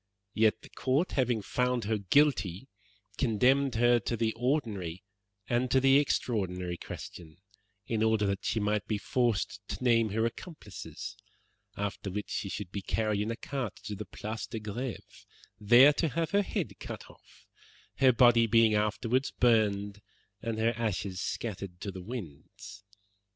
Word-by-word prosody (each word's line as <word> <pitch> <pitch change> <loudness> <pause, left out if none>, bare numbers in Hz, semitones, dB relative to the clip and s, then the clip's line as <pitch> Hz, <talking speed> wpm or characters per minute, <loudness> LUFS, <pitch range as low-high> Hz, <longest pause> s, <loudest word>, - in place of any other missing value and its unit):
Yet 110 -1 +2
the - - -13
Court, 135 +7 0
having 125 -5 0
found 125 0 0
her 110 +1 -1
guilty, 100 - +2 0.5
condemned 130 +2 +3
her 120 +1 +4
to 115 +2 -3
the 110 0 0
ordinary 110 - -2 0.4
and 125 +1 +1
to 130 - +4
the 135 +1 +6
extraordinary 90 -10 -1
question 80 -1 -9 0.5
in 115 -2 -1
order 110 -1 +3
that 100 0 -1
she 110 - 0
might 105 0 0
be 105 - 0
forced 115 -3 0
to - - -5
name 115 -3 +3
her 110 +3 0
accomplices, 115 - -7 0.6
after 100 0 -3
which 105 +2 -5
she 100 - -2
should 100 -2 -5
be 100 - -4
carried 105 +1 0
in 105 - -2
a 115 - -2
cart 130 -3 -4
to 105 - -5
the 105 +1 -6
Place 110 +2 -6
de 115 - -5
Greve, 110 +3 -7 0.3
there 120 +7 +7
to 165 - 0
have 160 +3 -2
her 200 0 +4
head 200 - -4
cut - - -7
off, - - -20 0.5
her 130 -1 +6
body 120 -1 +5
being 115 0 +5
afterwards 105 +5 +1
burned 105 -4 +1 0.4
and 115 -2 -3
her 115 +1 +2
ashes 100 -4 -2
scattered 95 -5 -4
to 100 - -5
the 95 0 -8
winds.' 100 - -9
110 Hz, 155 wpm, -30 LUFS, 100-125 Hz, 0.6 s, there